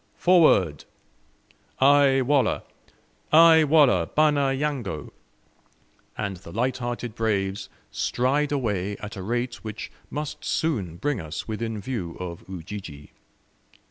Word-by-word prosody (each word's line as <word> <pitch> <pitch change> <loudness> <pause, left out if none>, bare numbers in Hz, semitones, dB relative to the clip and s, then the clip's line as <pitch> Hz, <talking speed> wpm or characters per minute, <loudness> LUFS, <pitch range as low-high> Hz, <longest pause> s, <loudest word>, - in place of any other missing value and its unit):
"Forward!" 150 - +4 0.9
"Ay 135 0 +5
Wallah, 135 -2 +1 0.7
ay 160 0 +7
Wallah, 140 - +4
bana 145 -3 +2
yango!" 135 - -3 1.1
and 100 -3 -3
the 85 -1 -12
lighthearted 120 0 -2
braves 100 -3 -1 0.2
stride 140 +4 0
away 105 -8 -1
at 105 +1 -8
a 95 - -6
rate 120 +5 -3
which 110 -1 -7 0.2
must 150 0 -5
soon 105 - -1
bring 130 +3 -2
us 80 0 -6
within 110 0 -4
view 100 -6 -5
of 85 -2 -6
Ujiji. 85 -5 -8
115 Hz, 110 wpm, -25 LUFS, 95-140 Hz, 1.1 s, ay